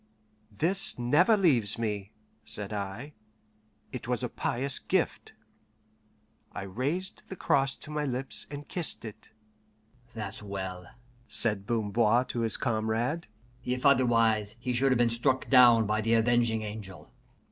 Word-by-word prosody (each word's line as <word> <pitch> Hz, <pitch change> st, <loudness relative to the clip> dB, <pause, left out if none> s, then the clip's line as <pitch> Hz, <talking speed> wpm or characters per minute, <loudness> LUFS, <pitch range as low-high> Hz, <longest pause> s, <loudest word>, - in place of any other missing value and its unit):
"This 165 Hz, -, +1 dB
never 155 Hz, -, +4 dB
leaves 125 Hz, -, +2 dB
me," 105 Hz, -3 st, -3 dB, 0.3 s
said 105 Hz, -1 st, -3 dB
I; 105 Hz, +8 st, -5 dB, 0.8 s
"it 125 Hz, -2 st, -7 dB
was 125 Hz, 0 st, +1 dB
a 125 Hz, -, -2 dB
pious 135 Hz, +5 st, -2 dB
gift." -, -, -1 dB, 1.2 s
I -, -, -5 dB
raised 140 Hz, -, -3 dB
the 190 Hz, -, -6 dB
cross 135 Hz, -6 st, +1 dB
to 150 Hz, -, -12 dB
my 150 Hz, 0 st, -2 dB
lips, 130 Hz, 0 st, -3 dB
and 145 Hz, 0 st, -8 dB
kissed 170 Hz, -8 st, -3 dB
it. 110 Hz, -, -10 dB, 0.8 s
"That's 110 Hz, -2 st, -6 dB
well," 95 Hz, -3 st, -6 dB, 0.4 s
said 105 Hz, -4 st, +2 dB
Bamboir 115 Hz, +2 st, +2 dB
to 120 Hz, -, -3 dB
his 115 Hz, -2 st, +1 dB
comrade. 115 Hz, +6 st, -1 dB, 0.4 s
"If 125 Hz, +2 st, -3 dB
otherwise, 115 Hz, -5 st, +3 dB
he 125 Hz, +1 st, -3 dB
should 135 Hz, +2 st, +2 dB
have 130 Hz, -, +3 dB
been 120 Hz, -1 st, +2 dB
struck 125 Hz, +3 st, 0 dB
down 120 Hz, -4 st, +7 dB
by 105 Hz, +1 st, 0 dB
the 115 Hz, +2 st, +2 dB
Avenging 115 Hz, -1 st, +2 dB
Angel." 105 Hz, -3 st, -8 dB
120 Hz, 135 wpm, -29 LUFS, 110-135 Hz, 1.2 s, down